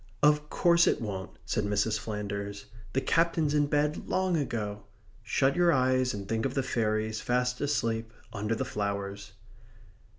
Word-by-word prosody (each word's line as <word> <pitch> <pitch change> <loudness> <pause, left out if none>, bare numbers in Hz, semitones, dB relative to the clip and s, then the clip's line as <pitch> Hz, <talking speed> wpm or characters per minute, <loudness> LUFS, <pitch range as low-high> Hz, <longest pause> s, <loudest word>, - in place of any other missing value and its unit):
"Of 150 0 +4
course 170 -1 +4
it - - +2
won't," 95 -5 -4 0.2
said 110 -1 0
Mrs. 105 +1 +1
Flanders. 100 -1 -4 0.3
"The 135 - +1
Captain's 165 +1 +2
in 145 -1 +3
bed 150 +1 0
long 185 -1 +1
ago. 110 -8 -2 0.4
Shut 135 +2 +1
your 175 -1 +4
eyes, 130 -2 +2
and 100 -3 -6
think 110 +1 -1
of 135 -1 -2
the 135 - +1
fairies, 110 -3 -1
fast 125 0 0
asleep, 115 -6 -1 0.2
under 105 +1 -1
the 130 - -2
flowers." 100 -2 -4
115 Hz, 155 wpm, -29 LUFS, 105-145 Hz, 0.4 s, Of